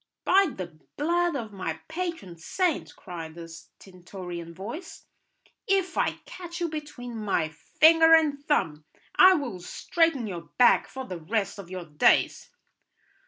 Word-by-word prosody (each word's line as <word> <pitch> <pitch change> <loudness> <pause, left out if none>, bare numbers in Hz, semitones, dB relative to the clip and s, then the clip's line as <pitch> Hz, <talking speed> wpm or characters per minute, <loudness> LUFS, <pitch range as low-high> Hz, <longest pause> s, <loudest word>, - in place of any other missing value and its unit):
"By 390 +1 +5
the 170 -4 -7 0.2
blood 345 +2 +1
of 225 -6 -5
my 165 -5 -4
patron 325 - -5
saint," 330 - -2
cried 165 -3 -8
a 170 -1 -8
stentorian 175 0 -10
voice, 230 - -8 0.6
"if 385 -2 +1
I - - +1
catch 350 -1 -8
you 340 -1 -1
between 295 -6 -7
my 200 -7 -1
finger 325 - +5
and 295 -3 +1
thumb, 155 - 0 0.3
I 370 0 +7
will 250 - -4
straighten 310 - 0
your 175 -5 -7
back 245 - +5
for 265 0 -7
the 180 -7 -6
rest 200 +3 -2
of 185 -3 -9
your 185 -1 -6
days." 150 -2 +2
225 Hz, 140 wpm, -27 LUFS, -, 0.6 s, I